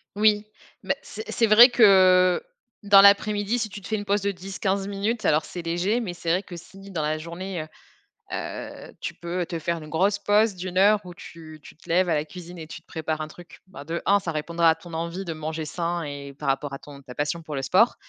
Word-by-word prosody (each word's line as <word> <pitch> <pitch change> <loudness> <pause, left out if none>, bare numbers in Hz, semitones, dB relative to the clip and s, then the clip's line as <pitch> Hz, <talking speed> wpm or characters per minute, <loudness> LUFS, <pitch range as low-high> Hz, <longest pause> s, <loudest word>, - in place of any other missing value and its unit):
Oui, 210 0 +3 0.4
bah, - - +1
c'est 435 - -8
c'est 230 - +2
vrai 235 +4 +9
que 185 -5 +5 0.4
dans 200 -1 +7
l'après-midi, 205 +3 +4
si 215 - -2
tu 205 - -8
te 195 - -11
fais 220 - -1
une 205 - -3
pause 200 0 +1
de 200 - 0
10-15 195 +1 -3
minutes, 210 +3 -2
alors 155 +1 +3
c'est 175 - -7
léger, 175 +8 0
mais 190 -7 -4
c'est 170 -1 -5
vrai 185 +3 +1
que 175 -3 -9
si 195 +3 -13
dans 165 -4 -2
la 155 +1 -1
journée, 170 +2 -6
heu, 155 - -8 0.7
heu, - - -7
tu - - -4
peux 175 +1 -4
te 165 -2 -5
faire 170 +2 -2
une 155 - -10
grosse 195 +6 +1
pause 205 +1 +2
de 185 +1 -6
1 185 0 -5
heure 205 +2 +5
où 180 - -9
tu 160 -2 -12
tu - - -14
te - - -21
lèves 180 +1 +2
à 160 - +2
la 150 0 -1
cuisine 175 +1 -10
et 160 - -8
tu - - -9
te - - -44
prépares 155 -1 -3
un 155 - -5
truc. 175 +2 -14
Bah 145 -6 -11
de 170 +1 -3
1 200 0 +4
ça 165 -4 -4
répondra 165 +2 +1
à 160 - +3
ton 165 +1 -13
envie 170 +4 -4
de 170 - -5
manger 160 0 -4
sain 170 +2 -3
et 140 -1 -7
par 140 0 -4
rapport 135 +1 -1
à 135 - -6
ton 140 -1 -13
ta 125 -2 -12
passion 150 +3 -2
pour 155 -2 -7
le 135 - -2
sport 195 - +3
175 Hz, 250 wpm, -25 LUFS, 160-200 Hz, 0.7 s, vrai